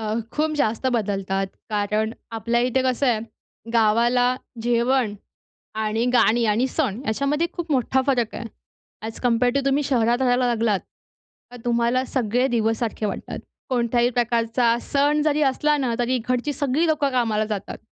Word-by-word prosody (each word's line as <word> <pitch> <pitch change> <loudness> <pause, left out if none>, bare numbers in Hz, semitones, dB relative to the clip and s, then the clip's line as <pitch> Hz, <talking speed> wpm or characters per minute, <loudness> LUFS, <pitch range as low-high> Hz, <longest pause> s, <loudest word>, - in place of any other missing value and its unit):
अ, 215 -1 -2 0.2
खूप 310 +1 0
जास्त 230 -3 0
बदलतात. 195 -3 -1 0.2
कारण 210 +1 0 0.2
आपल्या 235 +2 0
इथे 255 +1 +1
कसं 260 +1 +1
आहे, 235 -4 +2 0.5
गावाला 235 +3 +3 0.3
जेवण 240 -1 +1 0.7
आणि 220 +2 0
गाणी 240 -1 +4
आणि 220 +4 +2
सण 255 -7 -1
याच्यामध्ये 280 +8 0
खूप 335 -3 -4
मोठा 265 0 +2
फरक 245 -5 +1
आहे. - - -5 0.6
ॲझ 220 0 -6
कम्पेअर 245 0 +2
टू 280 - +2
तुम्ही 275 +2 +2
शहरात 240 -3 +2
राहायला 250 0 +2
लागलात. 225 -4 +1 0.7
तर - - -9
तुम्हाला 240 +1 +1
सगळे 250 -1 0
दिवस 225 -2 0
सारखे 225 -2 -2
वाटतात. 200 - -5 0.3
कोणत्याही 240 -1 +1
प्रकारचा 235 0 +1 0.2
सण 290 +2 +3
जरी 300 0 +1
असला 295 +2 +2
ना, 255 -5 -1
तरी 245 +1 +1
इकडची 250 +4 -1
सगळी 285 +4 0
लोकं 300 -3 +1
कामाला 225 -4 +1
जातात 210 -2 -5
240 Hz, 150 wpm, -23 LUFS, 225-265 Hz, 0.7 s, गाणी